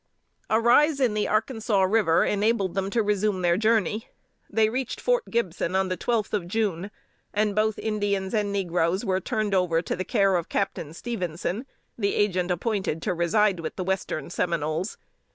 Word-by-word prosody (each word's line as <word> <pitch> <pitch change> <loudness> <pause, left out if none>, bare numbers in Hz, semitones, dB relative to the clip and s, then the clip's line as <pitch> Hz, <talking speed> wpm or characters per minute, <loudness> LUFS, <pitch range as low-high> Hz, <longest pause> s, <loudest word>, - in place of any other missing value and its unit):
A 220 - +3
rise 280 +6 +4
in 250 -5 +2
the 210 0 0
Arkansas 220 -2 +1
River 190 -4 +3
enabled 205 -2 +1
them 195 0 -1
to 225 +2 +1
resume 205 -2 0
their 170 -1 +4
journey. 220 0 +1 0.4
They 220 +1 +3
reached 255 +3 -3
Fort - - +1
Gibson 185 -5 -1
on 190 0 +1
the 185 - 0
twelfth 220 +3 -1
of 195 -5 -1
June, 195 -2 -1 0.5
and 210 0 +2
both 215 0 +1
Indians 205 -3 -1
and 210 -2 0
negroes 180 0 0
were 190 -2 +1
turned 215 +1 -1
over 180 -3 +2
to 150 - -2
the 185 - -3
care 195 -1 +2
of 170 - -4
Captain 165 -5 -2
Stephenson, 185 - -4 0.3
the 200 -2 0
agent 185 -3 +1
appointed 180 -3 -1
to - - 0
reside 185 +3 +2
with 160 -1 -5
the 185 - -3
Western 180 -5 -2
Seminoles. 170 +1 -1
200 Hz, 170 wpm, -26 LUFS, 180-220 Hz, 0.5 s, rise